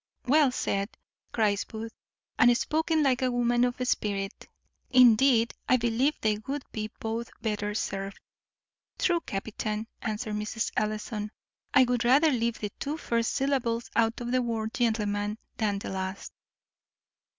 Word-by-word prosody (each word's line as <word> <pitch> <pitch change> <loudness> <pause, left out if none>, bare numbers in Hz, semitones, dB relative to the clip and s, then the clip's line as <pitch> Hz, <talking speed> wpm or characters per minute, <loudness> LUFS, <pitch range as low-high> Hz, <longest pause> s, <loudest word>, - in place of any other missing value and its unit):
"Well 285 +1 +5
said," 200 -4 -1 0.4
cries 210 -3 +1
Booth, 225 +1 -7 0.5
"and 245 -1 +6
spoken 320 +1 +1
like 260 -3 +2
a 255 - +2
woman 240 0 +2
of 245 0 +1
spirit. 200 -4 -2 0.4
Indeed, 245 -1 +5 0.2
I 255 - +6
believe 240 +5 +1
they 215 -1 +1
would 280 0 -3
be 215 -1 -4
both 225 +1 -3
better 210 -1 -2
served." 195 -2 -3 0.8
"True, 350 -2 +2
captain," 215 -2 -4 0.2
answered 215 0 -3
Mrs. 210 +1 -2
Ellison; 215 0 -2 0.5
"I 265 - +8
would 245 -2 +1
rather 280 +6 +5
leave 235 -3 0
the 210 -1 -4
two 290 +2 -3
first 230 -6 0
syllables 255 -4 0
out 225 0 +2
of 240 0 -4
the 255 0 +3
word 225 -2 -2
gentleman 210 -3 0 0.2
than 210 -3 0
the 200 - -5
last." 190 0 -5
230 Hz, 140 wpm, -28 LUFS, 210-250 Hz, 0.8 s, I